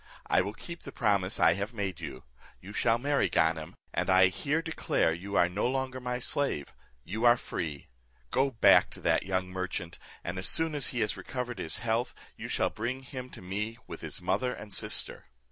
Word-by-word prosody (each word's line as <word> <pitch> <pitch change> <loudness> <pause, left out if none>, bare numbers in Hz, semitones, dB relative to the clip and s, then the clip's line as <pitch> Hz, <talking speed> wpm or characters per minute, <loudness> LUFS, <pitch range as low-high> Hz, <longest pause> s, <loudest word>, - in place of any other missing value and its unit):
I - - +4
will 100 +3 -4
keep 170 +6 -8
the - - -8
promise 100 -4 +1
I - - +6
have 100 +4 -4
made 100 -5 -2
you. 65 -1 -7 0.4
You 100 +3 -10
shall 115 +1 +3
marry 140 +3 +1
Ganem, 80 -1 +1 0.2
and - - 0
I 95 0 +7
here 150 - -1
declare 160 - +1
you 100 +4 -5
are 90 - +5
no 95 +6 0
longer 130 0 -1
my 125 -1 -2
slave; 125 - 0 0.3
you 110 - -4
are 120 0 +7
free. 75 -10 -5 0.4
Go 135 +1 +3
back 115 -4 +6
to - - -12
that - - +2
young 95 -1 0
merchant, 90 -2 -4 0.2
and 90 +2 -3
as 95 - +1
soon 160 -1 +2
as 145 -3 +2
he 120 - -1
has 105 - +1
recovered 125 -1 -4
his 80 - 0
health, 115 +2 0 0.2
you - - -6
shall - - +1
bring 125 +5 -3
him 130 -1 -7
to - - -11
me 105 +5 -3
with - - -8
his - - -4
mother 100 +8 +1
and 105 -1 -9
sister." - - -1
105 Hz, 200 wpm, -30 LUFS, 95-125 Hz, 0.4 s, I